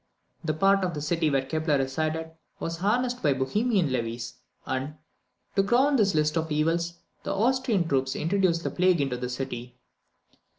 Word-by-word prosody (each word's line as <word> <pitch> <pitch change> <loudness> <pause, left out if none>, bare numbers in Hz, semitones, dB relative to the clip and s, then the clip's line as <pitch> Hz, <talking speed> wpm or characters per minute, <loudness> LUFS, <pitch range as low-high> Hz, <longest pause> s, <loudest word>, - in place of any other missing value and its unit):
The 155 -2 -1
part 195 +3 +3
of 180 -3 -1
the - - -3
city 160 +1 +1
where 135 -2 +1
Kepler 155 +1 0
resided 155 +4 -2 0.3
was 165 0 -3
harassed 245 +6 0
by 145 -5 +3
the - - -6
Bohemian 205 - +1
levies, 120 0 -3 0.3
and, 130 +3 -3 0.6
to 195 - +5
crown 255 +8 +3
this 200 -7 +3
list 150 0 +2
of 160 -1 -1
evils, 165 +3 0 0.3
the 195 - -3
Austrian 230 -4 +1
troops 135 -3 0
introduced 170 0 +1
the - - -2
plague 180 -1 +3
into 135 -3 0
the 125 0 -4
city. 125 -1 -5
160 Hz, 170 wpm, -27 LUFS, 135-195 Hz, 0.6 s, to